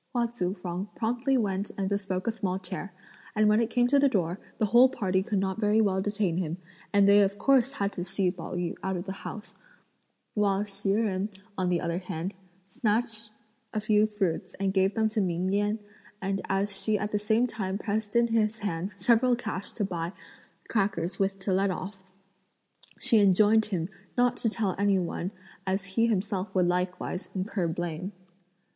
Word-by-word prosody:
Hua 240 Hz, -1 st, +3 dB
Tzu 195 Hz, -6 st, -2 dB
fang 180 Hz, +1 st, -4 dB
promptly 245 Hz, +4 st, +1 dB
went 200 Hz, -3 st, -1 dB
and 195 Hz, -1 st, 0 dB
bespoke 195 Hz, -2 st, -2 dB
a 230 Hz, -, +2 dB
small 195 Hz, -4 st, -2 dB
chair; 190 Hz, +1 st, -6 dB, 0.4 s
and 215 Hz, 0 st, +4 dB
when 210 Hz, +1 st, +5 dB
it 230 Hz, -, 0 dB
came 245 Hz, +1 st, +3 dB
to 280 Hz, +3 st, +4 dB
the 280 Hz, 0 st, +5 dB
door, 180 Hz, -5 st, 0 dB, 0.2 s
the 215 Hz, -, +2 dB
whole 240 Hz, +5 st, +6 dB
party 190 Hz, -7 st, 0 dB
could 210 Hz, +1 st, -1 dB
not 190 Hz, +2 st, -1 dB
very 210 Hz, 0 st, +3 dB
well 195 Hz, -3 st, +2 dB
detain 205 Hz, -4 st, 0 dB
him, 170 Hz, -2 st, -2 dB, 0.3 s
and 200 Hz, -1 st, +5 dB
they 200 Hz, +1 st, +7 dB
of 200 Hz, 0 st, +1 dB
course 270 Hz, 0 st, +3 dB
had 200 Hz, 0 st, -1 dB
to 175 Hz, -, -3 dB
see 190 Hz, 0 st, 0 dB
Pao 180 Hz, -1 st, -7 dB
yü 175 Hz, -1 st, -1 dB
out 190 Hz, 0 st, -1 dB
of 175 Hz, -, -5 dB
the 190 Hz, -, -4 dB
house; 210 Hz, +2 st, -7 dB, 0.8 s
while 205 Hz, -1 st, +2 dB
Hsi 200 Hz, -1 st, -2 dB
Jen, 205 Hz, -2 st, 0 dB, 0.3 s
on 185 Hz, -2 st, 0 dB
the 175 Hz, -1 st, +1 dB
other 170 Hz, +1 st, -1 dB
hand, 180 Hz, 0 st, -4 dB, 0.3 s
snatched 220 Hz, +2 st, -1 dB, 0.5 s
a -, -, +2 dB
few 215 Hz, 0 st, +3 dB
fruits 195 Hz, -6 st, -2 dB
and 195 Hz, -1 st, -1 dB
gave 190 Hz, +1 st, +2 dB
them 220 Hz, -1 st, +3 dB
to 215 Hz, 0 st, 0 dB
Ming 185 Hz, +1 st, 0 dB
Yen; 205 Hz, +1 st, +1 dB, 0.4 s
and 195 Hz, 0 st, -1 dB
as 195 Hz, 0 st, +1 dB
she 215 Hz, -1 st, +2 dB
at 210 Hz, +1 st, -3 dB
the 210 Hz, -, +1 dB
same 220 Hz, +3 st, +2 dB
time 200 Hz, -5 st, -3 dB
pressed 210 Hz, 0 st, -3 dB
in 235 Hz, 0 st, +5 dB
his 225 Hz, -1 st, +2 dB
hand 195 Hz, -2 st, -3 dB
several 240 Hz, +3 st, +4 dB
cash 220 Hz, -5 st, -4 dB
to 210 Hz, -, -1 dB
buy 170 Hz, -1 st, -3 dB, 0.5 s
crackers 195 Hz, -5 st, -1 dB
with 195 Hz, 0 st, +1 dB
to 190 Hz, 0 st, -1 dB
let 195 Hz, +1 st, +2 dB
off, 190 Hz, +2 st, -5 dB, 1.0 s
she 225 Hz, -, +3 dB
enjoined 210 Hz, +2 st, +5 dB
him 180 Hz, -6 st, -2 dB, 0.3 s
not 245 Hz, 0 st, +3 dB
to 225 Hz, -, 0 dB
tell 210 Hz, -4 st, -1 dB
any 200 Hz, -1 st, +3 dB
one 175 Hz, 0 st, -2 dB, 0.4 s
as 190 Hz, +1 st, 0 dB
he 230 Hz, +5 st, +1 dB
himself 200 Hz, -2 st, -1 dB
would 180 Hz, -1 st, +4 dB
likewise 180 Hz, +1 st, -2 dB
incur 190 Hz, -1 st, -1 dB
blame. 175 Hz, +3 st, -3 dB
200 Hz, 190 wpm, -28 LUFS, 185-215 Hz, 1.0 s, they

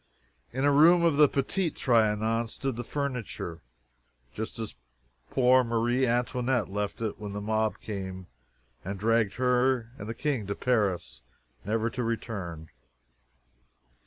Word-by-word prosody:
In 130 Hz, +3 st, -1 dB
a 145 Hz, -, +5 dB
room 170 Hz, +5 st, +6 dB
of 165 Hz, -4 st, +3 dB
the 150 Hz, -1 st, +7 dB
Petit 165 Hz, +6 st, 0 dB
Trianon 115 Hz, -3 st, +1 dB
stood 135 Hz, +2 st, -3 dB
the 120 Hz, -, -4 dB
furniture, 125 Hz, -, -4 dB, 0.7 s
just -, -, -5 dB
as -, -, -5 dB, 0.6 s
poor 130 Hz, 0 st, +5 dB
Marie 120 Hz, +2 st, +1 dB
Antoinette 125 Hz, -1 st, 0 dB
left 105 Hz, +2 st, -3 dB
it 110 Hz, -2 st, -3 dB
when 105 Hz, -1 st, -6 dB
the 105 Hz, -, -3 dB
mob 110 Hz, +1 st, 0 dB
came 95 Hz, -3 st, -6 dB, 0.6 s
and 100 Hz, +2 st, -4 dB
dragged 115 Hz, -1 st, +2 dB
her 125 Hz, -1 st, +2 dB
and 105 Hz, +1 st, -6 dB
the 115 Hz, -, -4 dB
King 130 Hz, -9 st, -1 dB
to 100 Hz, -, -2 dB
Paris, 95 Hz, -, 0 dB, 0.4 s
never 115 Hz, +3 st, 0 dB
to 125 Hz, -, -3 dB
return. 100 Hz, -9 st, -4 dB
115 Hz, 135 wpm, -28 LUFS, 105-130 Hz, 0.7 s, the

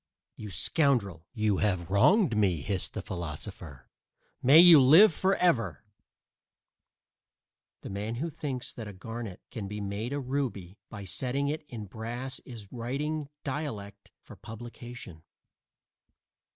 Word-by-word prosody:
"You 105 Hz, -, -8 dB
scoundrel, 100 Hz, -, +1 dB
you 105 Hz, -2 st, +1 dB
have 90 Hz, -4 st, -1 dB
wronged 135 Hz, -, +4 dB
me," 95 Hz, -7 st, +2 dB
hissed 95 Hz, +3 st, -3 dB
the -, -, -4 dB
philosopher. 80 Hz, -4 st, -7 dB, 0.5 s
"May 140 Hz, +5 st, +7 dB
you 170 Hz, -4 st, +10 dB
live 160 Hz, +10 st, +8 dB
forever!" 175 Hz, -, +1 dB, 2.0 s
The -, -, -8 dB
man 105 Hz, +4 st, -3 dB
who 160 Hz, +7 st, -3 dB
thinks 130 Hz, -4 st, -5 dB
that 115 Hz, -3 st, -7 dB
a 105 Hz, -, -8 dB
garnet 115 Hz, 0 st, -7 dB
can 110 Hz, -6 st, -5 dB
be 105 Hz, +1 st, -5 dB
made 100 Hz, +4 st, -4 dB
a 145 Hz, -, -1 dB
ruby 125 Hz, -8 st, -3 dB
by 105 Hz, -2 st, -8 dB
setting 130 Hz, +9 st, -2 dB
it 155 Hz, +2 st, -2 dB
in 110 Hz, -6 st, -7 dB
brass 120 Hz, +6 st, -6 dB
is 110 Hz, -6 st, -10 dB
writing 140 Hz, +5 st, -3 dB
"dialect" 110 Hz, -9 st, -5 dB
for -, -, -12 dB
publication. 120 Hz, -5 st, -10 dB
115 Hz, 125 wpm, -29 LUFS, 100-140 Hz, 2.0 s, you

